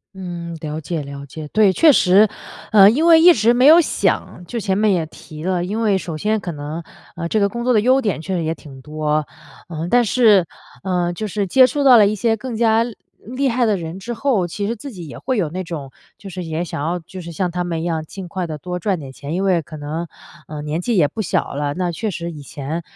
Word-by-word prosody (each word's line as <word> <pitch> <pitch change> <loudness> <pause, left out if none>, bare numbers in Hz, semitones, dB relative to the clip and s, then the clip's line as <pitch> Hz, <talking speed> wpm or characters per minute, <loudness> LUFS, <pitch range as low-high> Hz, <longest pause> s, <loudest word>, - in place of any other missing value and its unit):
嗯， 175 -3 -6
了 155 0 -5
解 160 +1 -3
了 140 0 -8
解。 150 +3 -8
对， 210 +4 +3
确 305 - +5
实， 200 0 +5 0.5
呃， 200 -2 +9
因 300 +8 +1
为 325 -1 +7
一 355 +2 +9
直 225 -1 +3
没 250 +2 +3
有 320 +4 +9
想 295 - -1
就 235 +6 -4
前 195 -3 -1
面 215 0 +3
也 170 -3 0
提 155 -1 -12
了， 180 -2 0
因 205 +5 -3
为 210 -4 +2
首 170 -4 -5
先 215 +5 0
可 180 - -4
能， 150 +2 -6 0.3
呃， 170 0 -4
这 215 - +1
个 200 - +3
工 235 +4 -5
作 250 - +2
的 220 - +4
优 255 +5 +3
点 205 - -1
确 190 +3 -3
实 170 - -1
也 160 0 -1
挺 140 -4 -13
多， 150 +1 -1 0.4
呃， 165 0 -4
但 245 +3 +4
是， 215 -5 +4 0.4
呃， 180 -2 -1
就 215 +5 -4
是 200 0 -2
接 260 +8 +6
触 280 +3 -1
到 260 -2 +8
了 215 -3 +7
一 205 - 0
些 225 +2 +1
更 230 +1 -6
加 225 0 +3 0.4
厉 255 +4 -1
害 245 -1 +1
的 215 -3 +1
人 170 +2 -6
之 240 +5 -5
后， 230 -8 0
其 200 +4 -4
实 230 - -2
自 275 +5 -9
己 175 -7 -9
也 140 - -9
会 260 -2 -2
有 180 - +1
那 185 +3 -4
种， 150 -6 -7 0.3
就 195 - -10
是 185 -1 -6
也 165 +1 -3
想 145 -3 -5
要 175 +2 -1
就 185 +3 -10
是 170 0 -8
像 180 +2 -1
他 180 +1 -3
们 170 -2 -3
一 - - -3
样 165 -2 -2
尽 185 +4 -9
快 180 +1 -4
地 155 -2 -5
多 180 +4 -5
赚 185 -1 -1
点 135 -2 -9
钱。 145 +3 -7
因 185 +3 -1
为 180 -3 +2
可 155 +1 -10
能， 155 +3 -5 0.4
呃， 150 -1 -6
年 155 +3 -3
纪 230 +3 0
也 155 -5 +4
不 220 - -5
小 190 - -1
了。 145 0 -2
那 180 -1 -1
确 215 +6 -3
实 170 -2 -5
以 150 -3 -9
前， 145 +4 -5
180 Hz, 275 characters per minute, -19 LUFS, 160-220 Hz, 0.5 s, 呃